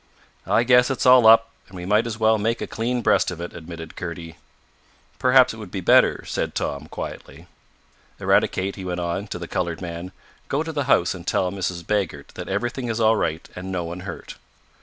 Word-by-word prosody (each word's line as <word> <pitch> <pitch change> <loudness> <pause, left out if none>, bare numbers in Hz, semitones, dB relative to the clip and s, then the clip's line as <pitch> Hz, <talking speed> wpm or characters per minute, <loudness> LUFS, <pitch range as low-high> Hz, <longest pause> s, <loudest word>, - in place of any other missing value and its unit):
"I 115 - +3
guess 125 +1 +5
it's 135 - -1
all 125 -3 +7
up, 115 0 +6 0.2
and 95 - -14
we 90 -1 -6
might 105 +4 +2
as 110 -2 -4
well 110 0 +3
make 115 +3 0
a - - -3
clean 120 +2 -2
breast - - +3
of 90 -2 -6
it," 85 0 -6
admitted 80 -1 -9
Kurdy. 85 -2 -7 0.8
"Perhaps 130 -1 +5
it - - -10
would 105 -4 -9
be 95 - -4
better," 90 - +4
said - - -3
Tom 70 - -3
quietly. - - -8 0.7
"Eradicate," 95 +1 +1
he 95 - -7
went 90 -1 -3
on, 85 +4 -3
to - - -5
the 85 -1 -7
colored 85 -1 -2
man, 85 0 -6 0.4
"go 145 +3 0
to 160 - -5
the 145 -3 -2
house - - +3
and - - -10
tell 90 - +1
Mrs. 90 -3 -4
Baggert 95 -9 -2
that - - -8
everything 120 +5 -2
is 115 -1 -2
all 110 0 +4
right 80 -6 -2
and 95 +1 -6
no 90 -2 -2
one 85 +2 -6
hurt." 95 - -8
95 Hz, 205 wpm, -23 LUFS, 85-115 Hz, 0.8 s, all